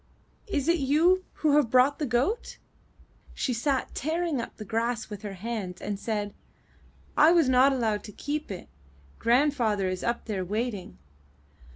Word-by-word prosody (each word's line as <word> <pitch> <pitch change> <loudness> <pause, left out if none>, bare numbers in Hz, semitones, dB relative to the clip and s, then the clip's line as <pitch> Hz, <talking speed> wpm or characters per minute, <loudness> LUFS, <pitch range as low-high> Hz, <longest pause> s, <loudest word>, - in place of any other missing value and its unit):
Is 295 -8 -1
it 340 0 +3
you 330 +7 +3
who 300 -2 +2
have 285 -6 +3
brought 255 +4 +4
the 300 - -1
goat?" 255 - 0 0.8
She 255 - -1
sat 265 +3 -1
tearing 320 -1 -1
up - - -8
the 215 - -7
grass 230 +1 -2
with 205 -1 -6
her 205 -2 -6
hands 195 -3 -5
and 205 -1 -4
said: 205 -2 -2 0.8
'*I 310 +2 +7
was 335 -5 +4
not 260 +2 +5
allowed 225 -5 0
to 210 - -8
keep 295 +8 -4
it; 190 -3 -7 0.5
grandfather 235 -6 +2
is 185 0 -3
up 235 0 -1
there 200 -5 -2
waiting. 205 - -3
240 Hz, 160 wpm, -27 LUFS, 210-290 Hz, 0.8 s, I